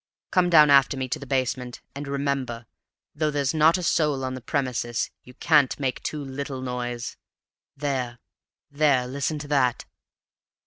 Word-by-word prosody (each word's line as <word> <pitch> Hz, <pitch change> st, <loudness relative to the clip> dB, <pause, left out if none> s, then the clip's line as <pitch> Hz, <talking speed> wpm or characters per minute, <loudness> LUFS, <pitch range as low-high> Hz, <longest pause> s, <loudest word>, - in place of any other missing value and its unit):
Come 180 Hz, -1 st, +3 dB
down 150 Hz, -4 st, +7 dB
after 140 Hz, -1 st, +5 dB
me 130 Hz, -1 st, -2 dB
to -, -, -2 dB
the 140 Hz, -, -9 dB
basement; 125 Hz, -1 st, -2 dB
and 140 Hz, +1 st, -6 dB
remember, 140 Hz, -4 st, -2 dB, 0.5 s
though 155 Hz, +1 st, 0 dB
there's 140 Hz, -3 st, 0 dB
not 160 Hz, +3 st, +5 dB
a 180 Hz, -, -4 dB
soul 150 Hz, -5 st, +1 dB
on 130 Hz, -, -3 dB
the 130 Hz, -, -6 dB
premises, 120 Hz, -3 st, -2 dB
you 125 Hz, -, -15 dB
can't 150 Hz, -5 st, +3 dB
make 130 Hz, -2 st, -2 dB
too 150 Hz, -1 st, -4 dB
little 135 Hz, -1 st, -5 dB
noise. 120 Hz, -1 st, -4 dB, 0.6 s
There 130 Hz, -4 st, -2 dB, 0.5 s
there 140 Hz, -3 st, +3 dB
listen 140 Hz, +4 st, -2 dB
to 145 Hz, 0 st, -7 dB
that!" 130 Hz, -4 st, +1 dB
135 Hz, 160 wpm, -25 LUFS, 125-145 Hz, 0.6 s, down